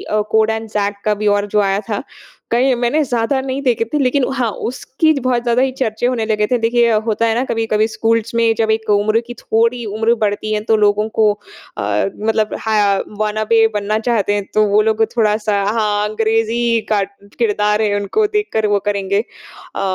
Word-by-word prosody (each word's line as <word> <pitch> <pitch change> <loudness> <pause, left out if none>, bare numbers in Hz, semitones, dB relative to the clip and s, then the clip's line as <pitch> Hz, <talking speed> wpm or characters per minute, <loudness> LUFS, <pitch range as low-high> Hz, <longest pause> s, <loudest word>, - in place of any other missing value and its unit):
जो 210 - +2
code 220 0 +3
and 220 0 -3
Zac 205 -1 -1
का 215 - +3
भी 210 0 -2
और 205 - -2
जो 210 +1 +1
आया 195 0 +1
था। 210 +2 -2 0.5
कहीं 255 +3 +3
मैंने 245 +6 +1
ज़्यादा 245 0 0
नहीं 265 +1 -3
देखें 245 -4 +1
थे - - +2
लेकिन 270 +1 +1
हाँ, 245 -4 0
उसकी 260 +7 -1
बहुत 245 -2 0
ज़्यादा 240 +1 +2
ही 265 0 +1
चर्चे 245 -3 -2
होने 245 -3 0
लगे 210 -1 +1
थे। 250 - +3
देखिए 235 +1 +2
होता 225 0 0
है 225 -1 +1
ना 245 - +1
कभी-कभी 220 -2 0
स्कूल्स 225 0 -1
में 230 -1 +3
जब 220 -1 +1
एक 220 0 -2
उम्र 210 +2 +3
की 240 - -6
थोड़ी 230 +2 0
उम्र 220 +2 +1
बढ़ती 210 +1 -1
है 210 - -1
तो 220 - +4
लोगों 210 0 +2
को 215 -1 +3 0.5
अ, 105 -1 0
मतलब 215 0 0
हा 210 -3 +2 0.2
वॉनाबी 215 +1 +2
बनना 210 +1 0
चाहते 220 -3 0
हैं 205 -1 -2
तो 215 - +4
वो 205 +1 +3
लोग 220 +1 +1
थोड़ा-सा 210 -2 +1
हाँ, 210 0 0
अंग्रेज़ी 225 +1 0
कार्ट 200 -1 -3
किरदार 210 -1 +1
है 210 -1 +1
उनको 205 - 0
देखकर 410 - -1
वो 205 -1 +2
करेंगे। 200 -1 0 0.6
अ, - - -3
220 Hz, 195 wpm, -17 LUFS, 210-235 Hz, 0.6 s, तो